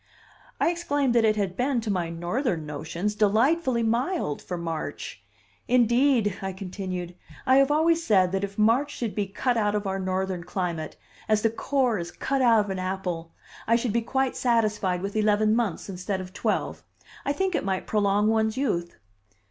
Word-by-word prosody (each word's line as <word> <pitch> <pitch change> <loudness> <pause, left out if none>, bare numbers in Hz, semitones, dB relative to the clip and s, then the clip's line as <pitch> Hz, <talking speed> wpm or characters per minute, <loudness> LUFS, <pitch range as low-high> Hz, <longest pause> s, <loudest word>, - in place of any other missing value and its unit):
I - - +3
exclaimed 290 -7 0
that 235 -2 +4
it 215 -1 +3
had 195 -3 -1
been, 255 +3 +1
to 220 -2 -2
my 175 -3 -1
Northern 175 - -2
notions, 160 +7 -3
delightfully 235 +5 +2
mild 235 - 0
for 180 - -5
March. 165 -2 -5 0.4
"Indeed," 240 -3 +3
I 190 -1 -3
continued, 185 -2 -5 0.3
"I 260 +1 +5
have 275 0 +5
always 325 +3 +3
said 190 - +3
that 195 +1 -1
if 200 0 -5
March 240 +7 +2
could 230 -4 -2
be 205 -2 -1
cut 240 +5 -1
out 210 -1 +1
of 205 0 -1
our 195 0 -2
Northern 185 -1 -2
climate, 175 -3 -3 0.3
as 215 -1 +3
the 225 - +3
core 250 -2 0
is 170 0 -5
cut 270 +9 -2
out 230 -4 +5
of 200 - -5
an 190 - -3
apple, 185 -3 -4 0.3
I 230 - +4
should 235 -2 0
be 235 - +2
quite 265 +3 -1
satisfied 210 -6 +1
with 200 +1 -4
eleven 215 0 +3
months, 225 -8 -1
instead 190 0 -3
of 185 0 -8
twelve. - - -1 0.4
I 280 - 0
think 380 +5 0
it - - 0
might 190 -1 -2
prolong 205 0 +2
one's 220 +1 +1
youth." 175 -11 -1
210 Hz, 180 wpm, -26 LUFS, 185-240 Hz, 0.4 s, I